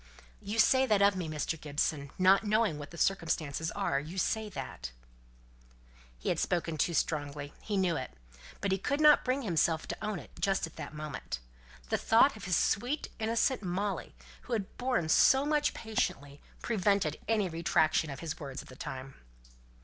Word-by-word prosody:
"You 210 +3 -4
say 260 +4 +5
that 210 -3 +4
of 200 0 +5
me, 175 -4 -3
Mr. 155 +1 -3
Gibson? 145 -1 -1
Not 190 +2 +5
knowing 210 -7 +1
what 145 - -7
the 170 - -11
circumstances 160 -4 0
are, - - 0
you 160 +6 -8
say 215 +3 0
that?" - - -6 1.3
He - - -3
had - - +1
spoken 170 -2 0
too 165 +3 0
strongly: 145 -2 -2
he 205 -2 -2
knew 185 -3 +2
it. 130 - -4 0.5
But 200 - 0
he 190 - +1
could 280 +8 -1
not 300 -1 +7
bring 260 +2 0
himself 165 -4 +1
to - - -5
own 210 -2 -2
it - - -11
just 195 -2 +1
at 165 - -12
that - - -7
moment. 150 - -5 0.5
The - - +1
thought 230 +4 +5
of 215 - -9
his 180 -3 +2
sweet 250 +9 0
innocent 230 +3 +1
Molly, 195 +2 -3 0.3
who 250 - -6
had 205 -4 -3
borne 245 -10 0
so 265 - +5
much 295 0 +1
patiently, 145 -10 -2 0.2
prevented 200 -7 +1
any 215 -3 +2
retractation 160 -2 +1
of 135 - -7
his 160 -1 -5
words 135 -3 -6
at - - -17
the 130 - -11
time. 130 +1 -7
185 Hz, 180 wpm, -31 LUFS, 155-215 Hz, 1.3 s, not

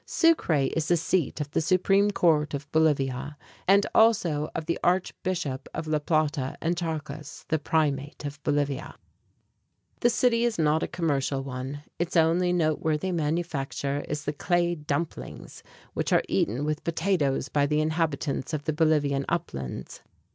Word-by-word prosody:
Sucre 170 - +2
is 165 -1 0
the 175 - +3
seat 165 -2 0
of 145 -1 -4
the - - +1
supreme 195 +4 +3
court 155 -7 +2
of 140 0 -6
Bolivia, 145 -2 +1 0.3
and 200 +1 +5
also 175 -10 +3
of 160 - -3
the 170 - -1
archbishop 180 -5 -1
of 160 - -3
La 155 -1 +1
Plata 150 -3 0
and 170 +2 0
Charcas, 155 -4 -5
the 160 - +1
primate 145 -1 -1
of 145 +1 -6
Bolivia. 145 -2 -1 1.0
The 240 - +4
city 235 -1 +2
is 235 -2 +1
not 155 0 +2
a - - -1
commercial 140 -5 -1
one. 135 +2 -6 0.2
Its 175 +1 0
only 170 +2 +3
noteworthy 160 0 0
manufacture 150 -4 -2
is 150 +1 -3
the 145 - -1
"clay 175 +2 +1
dumplings" 150 0 -5 0.3
which - - -2
are - - +4
eaten 120 +8 0
with 155 +1 -2
potatoes 165 -6 0
by 145 -1 +1
the 150 +1 +1
inhabitants 155 -2 -1
of 145 - -4
the 155 - -1
Bolivian 150 -3 +2
uplands. 65 - -4
155 Hz, 150 wpm, -27 LUFS, 145-170 Hz, 1.0 s, and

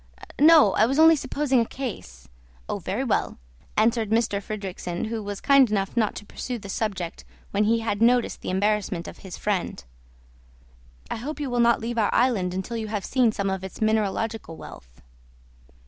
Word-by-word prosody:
"No; 305 - +7
I 220 - +4
was 270 +3 -1
only 320 +1 +7
supposing 280 -3 0
a 230 - +2
case." 65 - -7 0.4
"Oh, - - -3
very - - -3
well," - - -1 0.4
answered 220 0 +2
M. 225 - +5 0.2
Fridrikssen, 195 -2 -5
who 225 -1 -3
was 205 -1 -5
kind 275 -3 +5
enough 195 -1 -1
not 220 -3 +1
to 210 - -8
pursue 250 +4 -5
the 200 -3 -10
subject 190 -5 -3 0.3
when 205 +1 +2
he 230 +2 +2
had 220 -2 -2
noticed 240 +1 +3
the - - -5
embarrassment 200 -2 0
of - - -10
his 190 -2 -9
friend. 190 - -2 1.3
"I - - -2
hope 295 +7 -6
you 280 -4 -3
will 245 - 0
not 235 0 +4
leave 235 +1 -2
our 210 - +2
island 225 -8 +2
until 190 +5 -4
you 220 -1 -4
have 210 -2 -3
seen 250 -4 +2
some 200 -2 -2
of 190 -1 -3
its 190 - -8
mineralogical 220 -4 -1
wealth." - - -13
215 Hz, 180 wpm, -25 LUFS, 195-235 Hz, 1.3 s, No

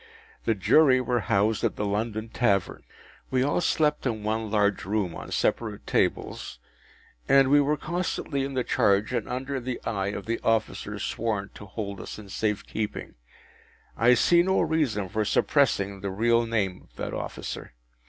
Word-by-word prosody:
The 115 - +2
Jury 130 - +5
were 125 -1 0
housed 105 0 +1
at - - +1
the 105 - -2
London 110 +2 -2
Tavern. 100 -5 0 0.5
We 130 -1 +2
all 145 +5 +1
slept 150 -4 +1
in 110 -3 -3
one 110 +1 -1
large 105 -2 +1
room 100 -3 -1
on - - -8
separate 110 -3 -1
tables, - - -1 0.7
and 135 -1 +5
we 145 0 +6
were 150 +2 +1
constantly 160 -4 -2
in 135 0 -4
the 130 - +1
charge 100 +2 +2
and 120 -4 -2
under 130 +2 -3
the 125 0 -4
eye 100 -4 -1
of 100 -1 -4
the 115 +1 -2
officer 115 -2 0
sworn 105 -3 -2
to 105 - -11
hold 100 -1 -5
us - - -7
in 105 -2 -11
safe 105 0 -1
keeping. 105 -1 -4 0.8
I 120 +3 +5
see 170 +8 +5
no 190 +2 +2
reason 150 - 0
for 110 +4 -1
suppressing 100 -5 +1
the 100 - -3
real 115 +4 +2
name 100 -5 -1
of - - -32
that - - -5
officer. - - -6
110 Hz, 170 wpm, -26 LUFS, 100-130 Hz, 0.8 s, we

